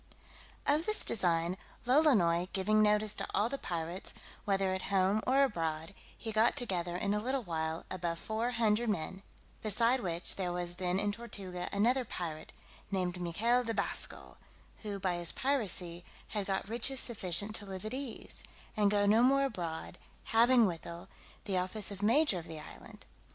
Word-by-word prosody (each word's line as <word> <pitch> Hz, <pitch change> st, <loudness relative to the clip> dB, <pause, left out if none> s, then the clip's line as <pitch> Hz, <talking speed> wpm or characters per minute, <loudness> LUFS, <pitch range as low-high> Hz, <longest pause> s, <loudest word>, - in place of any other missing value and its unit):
_ 285 Hz, -, +4 dB
OF 320 Hz, +3 st, -2 dB
this 430 Hz, -, +2 dB
design 175 Hz, -3 st, +1 dB, 0.3 s
Lolonois 220 Hz, -, +4 dB
giving 215 Hz, +3 st, +3 dB
notice 210 Hz, 0 st, +3 dB
to -, -, -4 dB
all 215 Hz, +3 st, +2 dB
the 275 Hz, +1 st, -4 dB
pirates, 170 Hz, +2 st, -4 dB, 0.3 s
whether 195 Hz, -1 st, +1 dB
at 190 Hz, -, -4 dB
home 195 Hz, +2 st, +3 dB
or 270 Hz, +2 st, +5 dB
abroad, 165 Hz, -, -2 dB, 0.2 s
he 225 Hz, -, -5 dB
got 220 Hz, +2 st, +3 dB
together, 180 Hz, -10 st, -1 dB
in 200 Hz, +2 st, 0 dB
a 210 Hz, -, +1 dB
little 260 Hz, +4 st, -1 dB
while, 160 Hz, -3 st, -3 dB
above 170 Hz, -2 st, -2 dB
four 220 Hz, +6 st, -2 dB
hundred 230 Hz, -1 st, +2 dB
men; 190 Hz, 0 st, -2 dB, 0.4 s
beside 230 Hz, +4 st, +2 dB
which, 175 Hz, -5 st, -1 dB
there 185 Hz, -2 st, -1 dB
was 175 Hz, 0 st, -4 dB
then 180 Hz, 0 st, 0 dB
in 205 Hz, 0 st, +1 dB
Tortuga 195 Hz, -5 st, -5 dB
another 240 Hz, +6 st, +2 dB
pirate, 165 Hz, -8 st, -6 dB, 0.4 s
named 180 Hz, -2 st, -1 dB
Michael 230 Hz, +9 st, +2 dB
de 225 Hz, -1 st, -2 dB
Basco, -, -, -2 dB, 0.4 s
who, 205 Hz, -2 st, -4 dB
by 185 Hz, -2 st, -1 dB
his 175 Hz, -1 st, +4 dB
piracy, 190 Hz, -10 st, 0 dB, 0.3 s
had 205 Hz, -2 st, -3 dB
got 195 Hz, 0 st, -1 dB
riches 240 Hz, +4 st, -1 dB
sufficient 205 Hz, -3 st, -1 dB
to 205 Hz, -, -8 dB
live 190 Hz, +1 st, -6 dB
at 215 Hz, -, -4 dB
ease, 260 Hz, -3 st, -3 dB, 0.3 s
and 210 Hz, -1 st, +3 dB
go 205 Hz, 0 st, +2 dB
no 215 Hz, +3 st, +5 dB
more 275 Hz, +2 st, +4 dB
abroad; 175 Hz, -10 st, -5 dB, 0.3 s
having, 235 Hz, +1 st, +6 dB
withal, 170 Hz, -2 st, -5 dB, 0.4 s
the 190 Hz, -3 st, 0 dB
office 190 Hz, +3 st, +1 dB
of 200 Hz, 0 st, -7 dB
major 230 Hz, -, +3 dB
of 165 Hz, -, -10 dB
the 160 Hz, -1 st, -7 dB
island. 150 Hz, -, -12 dB
200 Hz, 170 wpm, -33 LUFS, 180-230 Hz, 0.4 s, having